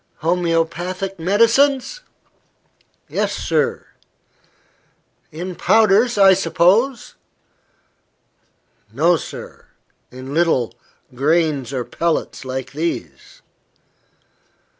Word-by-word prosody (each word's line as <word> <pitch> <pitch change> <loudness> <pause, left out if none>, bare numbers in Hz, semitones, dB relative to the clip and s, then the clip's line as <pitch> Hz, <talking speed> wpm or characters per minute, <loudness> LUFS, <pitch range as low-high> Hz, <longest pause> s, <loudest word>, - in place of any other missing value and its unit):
"Homoeopathic 175 +2 -1
medicines?" 245 - +2 1.1
"Yes, - - -2
sir." - - -1 1.5
"In 175 +4 -6
powders, 220 +3 +3
I 195 -1 +7
suppose?" 195 +8 +1 1.8
"No, 165 +9 +3
sir; 155 - -9 0.4
in 130 +2 -9
little, 155 -8 +1 0.4
grains 145 -1 0
or 130 -3 -3
pellets, 165 -5 -2
like 130 0 -5
these." 170 - -5
175 Hz, 70 wpm, -19 LUFS, 155-200 Hz, 1.8 s, I